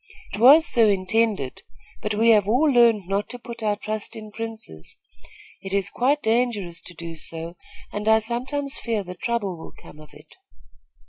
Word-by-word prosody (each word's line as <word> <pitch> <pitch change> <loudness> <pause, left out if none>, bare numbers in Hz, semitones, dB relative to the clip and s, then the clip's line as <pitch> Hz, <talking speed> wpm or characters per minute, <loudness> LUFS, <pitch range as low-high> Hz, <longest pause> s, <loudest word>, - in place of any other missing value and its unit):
"It - - -4
was 285 +7 +8
so 230 -7 +3
intended; 200 - 0 0.4
but 210 0 -2
we 225 +2 +3
have 210 -3 +4
all 245 +8 +3
learned 235 - +4
not 200 +2 -1
to 245 - -6
put 235 -1 -9
our 210 -1 +1
trust 215 0 -5
in 215 -1 -9
princes. 220 - -8 0.6
It 195 0 -7
is 200 -1 0
quite 280 +4 +1
dangerous 220 -7 0
to 175 - -10
do 165 0 -7
so, 165 +1 -5 0.4
and 210 +1 -4
I 220 0 +6
sometimes 255 +5 -3
fear 225 -4 -2
that 180 -1 -10
trouble 210 -8 -2
will - - -11
come 150 - -15
of 155 -1 -14
it." - - -18
215 Hz, 180 wpm, -23 LUFS, 190-235 Hz, 0.6 s, was